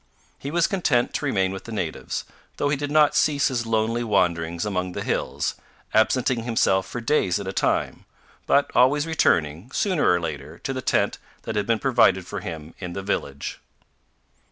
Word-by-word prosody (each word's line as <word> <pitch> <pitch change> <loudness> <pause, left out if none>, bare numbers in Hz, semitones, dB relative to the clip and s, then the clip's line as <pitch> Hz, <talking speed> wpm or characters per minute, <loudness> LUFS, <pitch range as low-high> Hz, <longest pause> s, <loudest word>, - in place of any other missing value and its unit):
He 140 - -5
was 170 +2 +2
content 160 - +1
to - - -2
remain 95 -8 +1
with 95 - -7
the 115 - -8
natives, 90 -8 -3 0.3
though 145 - +1
he 145 - +2
did 145 +1 -4
not 150 0 +4
cease 145 -2 +3
his 120 -3 -2
lonely 115 +1 0
wanderings 85 -5 0
among 90 -3 -2
the - - -4
hills, - - -1 0.4
absenting 120 +2 +2
himself 95 -5 +1
for 125 - -5
days 115 -6 +1
at 100 - -6
a 95 - -3
time, - - 0 0.4
but 140 0 +3
always 140 +4 +4
returning, 90 - +1
sooner 185 - +2
or 90 - +3
later, 75 -1 -6
to 135 - -4
the 130 - -4
tent - - +1 0.2
that 110 - -4
had 105 -1 0
been 115 - +3
provided 115 -8 +3
for 100 - -5
him 80 -3 -7
in 90 -2 -5
the 95 - -5
village. 70 -7 -3
110 Hz, 180 wpm, -24 LUFS, 90-135 Hz, 0.4 s, not